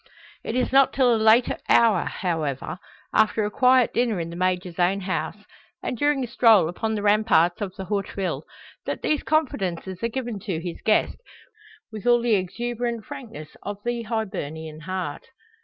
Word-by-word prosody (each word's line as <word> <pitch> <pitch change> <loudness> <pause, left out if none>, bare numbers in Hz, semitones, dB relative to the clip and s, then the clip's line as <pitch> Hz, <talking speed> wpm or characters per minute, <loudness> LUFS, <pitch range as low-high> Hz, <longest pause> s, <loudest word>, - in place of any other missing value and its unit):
It 225 - -4
is 255 - 0
not 270 0 +5
till 255 -3 +4
a - - +3
later 220 +2 +4
hour, 230 -2 +4
however, 160 -3 -3 0.3
after 220 0 +3
a 210 - -3
quiet 255 +1 +4
dinner 235 -5 +1
in 165 0 -4
the - - -7
Major's 180 -1 -1
own 185 +3 +2
house, 185 0 -3 0.5
and - - -2
during 290 +2 +1
a - - -3
stroll 225 -7 +5
upon 220 +6 -2
the 205 - -3
ramparts 205 -5 +3
of 190 -2 -4
the 190 - -6
Haute 200 0 -2
Ville, 195 -2 -2 0.4
that - - -3
these 305 - +1
confidences 190 - -1
are 230 - +1
given 240 -3 -4
to 190 -6 -3
his 170 0 -6
guest, 215 - +2 0.7
with 220 +2 -6
all 240 0 +6
the 235 -1 +1
exuberant 235 +4 -2
frankness 225 - -9
of 205 0 -5
the 240 0 -1
Hibernian 165 -9 -4
heart. 180 -2 -5
215 Hz, 175 wpm, -24 LUFS, 180-240 Hz, 0.7 s, all